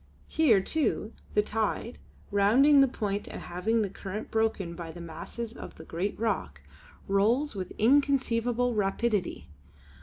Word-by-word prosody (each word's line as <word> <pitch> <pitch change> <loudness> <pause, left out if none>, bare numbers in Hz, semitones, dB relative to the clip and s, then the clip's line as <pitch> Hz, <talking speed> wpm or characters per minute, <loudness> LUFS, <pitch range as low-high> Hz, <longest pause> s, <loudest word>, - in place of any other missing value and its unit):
Here, 250 -12 +4
too, 245 -3 -1 0.2
the 210 - +4
tide, 220 +2 -2 0.3
rounding 250 +9 +5
the 275 - +6
point 205 -4 -3
and - - -7
having 215 +6 -1
the 200 - -2
current 200 +2 -6
broken 220 -6 0
by 170 -1 -7
the 175 - -10
masses 170 +8 -7
of - - -9
the 160 - -11
great 180 +7 -3
rock, 195 - -2 0.5
rolls 225 +9 +2
with 190 -3 -5
inconceivable 245 -1 +2
rapidity. 205 -1 -1
215 Hz, 140 wpm, -28 LUFS, 195-235 Hz, 0.5 s, the